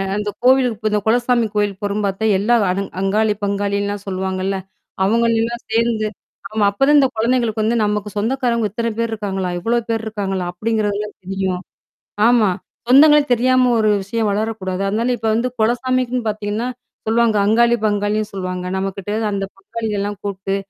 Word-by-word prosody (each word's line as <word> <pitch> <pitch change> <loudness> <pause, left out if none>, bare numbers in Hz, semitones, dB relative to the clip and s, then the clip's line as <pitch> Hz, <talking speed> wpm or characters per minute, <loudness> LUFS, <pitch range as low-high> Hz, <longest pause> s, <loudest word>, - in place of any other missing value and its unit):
அந்த 210 0 -2
கோவிலுக்கு 255 -3 +4
இப்ப 215 0 -1
இந்த 210 -1 +1
குலசாமி 240 0 +2
கோயில் 205 -2 0
போறோம்ன்னு 205 0 -1
பாத்தா, 195 +3 -2
எல்லா 235 +4 +3
அவ் 190 +2 0 0.2
அங்காளி, 210 +2 +1
பங்காளில்லாம் 200 0 -1
சொல்லுவாங்கள்ல, 190 0 -2 0.5
அவங்களையெல்லாம் 230 +2 +1
சேர்ந்து 225 -2 +1 0.4
ஆமா, 215 -1 +1
அப்பதான் 275 +8 +4
இந்தக் 265 -4 +3
குழந்தைகளுக்கு 230 -1 +1
வந்து, 230 +2 +1
"நமக்கு 210 0 -1
சொந்தக்காரவங்க 235 0 0
இத்தனை 230 +1 -2
பேர் 230 0 0
இருக்காங்களா? 195 -4 -3
இவ்வளவு 235 +4 0
பேர் 225 -1 -1
இருக்காங்களா?" 195 -4 -3
அப்படிங்கறதெல்லாம் 210 +1 -2
தெரியும். 190 -1 -2 0.7
ஆமா, 235 -4 +4 0.4
சொந்தங்களே 295 +3 +7
தெரியாம 255 +1 +3
ஒரு 215 -1 +3
விஷயம் 215 +2 -1
வளரக் 220 +2 -1
கூடாது. 185 +1 -2
அதனால 230 +4 0
இப்ப 225 - -5
வந்து 240 +3 +1
குலசாமிக்குன்னு 250 +1 0
பாத்தீங்கன்னா 210 +3 -2 0.4
சொல்லுவாங்க, 225 -1 +2
அங்காளி 235 +2 +4
பங்காளின்னு 205 +1 0
சொல்லுவாங்க. 185 -1 -4
நம்மகிட்டருந்து 200 +3 -2
அந்த 195 -1 -2
பங்காளிகள்லாம் 205 -1 -4
கூப்புட்டு, 195 -1 -3
215 Hz, 145 wpm, -19 LUFS, 200-235 Hz, 0.7 s, சொந்தங்களே